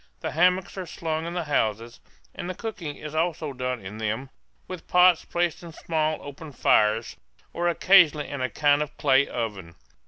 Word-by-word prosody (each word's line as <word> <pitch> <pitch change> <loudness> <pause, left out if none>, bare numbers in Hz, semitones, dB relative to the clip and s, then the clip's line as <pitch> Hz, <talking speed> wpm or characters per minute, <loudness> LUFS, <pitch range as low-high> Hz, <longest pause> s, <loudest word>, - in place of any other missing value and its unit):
The - - -3
hammocks 180 +3 +1
are 185 - -5
slung 160 0 -3
in 170 - -5
the 175 - -1
houses, 115 -5 -1 0.3
and 175 - -6
the 185 - -4
cooking 175 -10 -6
is 150 0 -8
also 155 -2 -1
done 125 -4 -4
in 105 +3 -8
them, 110 +5 -3 0.4
with 185 -2 -8
pots 180 -1 +5
placed 175 -1 -1
on 170 -1 -10
small 155 -1 -1
open 145 +1 -9
fires, 110 -1 +2 0.4
or 175 +1 -1
occasionally 170 -4 +4
in 140 -2 -5
a 130 - 0
kind 145 +5 +2
of 150 0 -5
clay 135 +1 +3
oven. 100 -8 -5
150 Hz, 180 wpm, -25 LUFS, 125-175 Hz, 0.4 s, pots